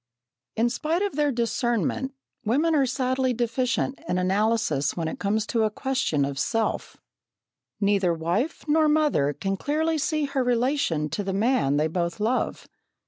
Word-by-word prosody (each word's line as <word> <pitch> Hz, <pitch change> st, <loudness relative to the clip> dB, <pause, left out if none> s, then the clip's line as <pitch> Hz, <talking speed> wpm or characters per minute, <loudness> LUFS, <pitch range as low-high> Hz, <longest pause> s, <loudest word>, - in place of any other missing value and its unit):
In 235 Hz, +2 st, +2 dB
spite 320 Hz, +9 st, -1 dB
of 405 Hz, -7 st, -2 dB
their 295 Hz, -1 st, +2 dB
discernment, 240 Hz, +2 st, -1 dB, 0.3 s
women 290 Hz, +9 st, +2 dB
are 280 Hz, -4 st, +3 dB
sadly 260 Hz, 0 st, 0 dB
deficient 240 Hz, +2 st, -1 dB
in -, -, +1 dB
analysis 185 Hz, -6 st, +1 dB
when 165 Hz, -2 st, -1 dB
it -, -, -5 dB
comes 210 Hz, +2 st, 0 dB
to 230 Hz, -1 st, 0 dB
a 215 Hz, -, +3 dB
question 215 Hz, -, 0 dB
of 140 Hz, 0 st, -4 dB
self. 225 Hz, +5 st, -1 dB, 0.8 s
Neither 200 Hz, -3 st, +2 dB
wife 175 Hz, -, -2 dB
nor 310 Hz, 0 st, +4 dB
mother 300 Hz, -, +2 dB
can 195 Hz, +7 st, -3 dB
clearly 315 Hz, +6 st, 0 dB
see 305 Hz, 0 st, 0 dB
her 275 Hz, -2 st, -1 dB
relation 245 Hz, -, +1 dB
to 205 Hz, -, -3 dB
the 195 Hz, 0 st, -2 dB
man 210 Hz, -, +2 dB
they 150 Hz, -, +2 dB
both 170 Hz, +3 st, -2 dB
love. 230 Hz, +4 st, -1 dB
235 Hz, 155 wpm, -25 LUFS, 190-275 Hz, 0.8 s, nor